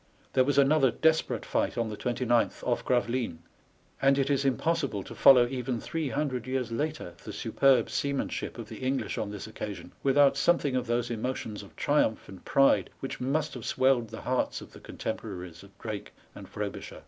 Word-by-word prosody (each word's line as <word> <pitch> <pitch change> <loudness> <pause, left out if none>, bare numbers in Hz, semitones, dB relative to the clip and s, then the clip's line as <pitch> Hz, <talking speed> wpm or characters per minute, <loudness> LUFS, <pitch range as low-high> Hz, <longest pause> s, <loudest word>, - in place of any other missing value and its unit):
There 130 - +5
was 140 +2 0
another 140 -1 +5
desperate 160 +5 +1
fight - - -1
on 115 -1 0
the 105 - -5
29th, 120 0 0
off 120 - 0
Gravelines, 120 -6 0 0.6
and 135 0 +4
it 135 0 +1
is 140 0 +1
impossible 140 - 0
to - - -9
follow 125 -3 +7
even 125 -1 -3
three 160 +4 -3
hundred 130 -4 -2
years 130 -2 -2
later 150 - -3
the - - -7
superb 135 -2 +3
seamanship 140 -1 -2
of - - -7
the - - -9
English 130 +1 -1
on 105 - -2
this 105 -1 -6
occasion 100 -5 -7
without 140 0 +4
something 145 -3 +2
of 125 -1 -1
those 120 +1 0
emotions 115 -2 -3
of 100 - -15
triumph 145 -6 +1
and 95 -2 -12
pride 135 0 +4
which 135 - -5
must 140 +5 0
have 125 - -7
swelled 130 -2 +2
the 115 - -8
hearts 130 0 -1
of - - -12
the - - -13
contemporaries 90 -6 -6
of 100 0 -17
Drake 110 -3 -6 0.2
and - - -11
Fro - - -3
bisher. - - -9
130 Hz, 185 wpm, -29 LUFS, 115-140 Hz, 0.6 s, follow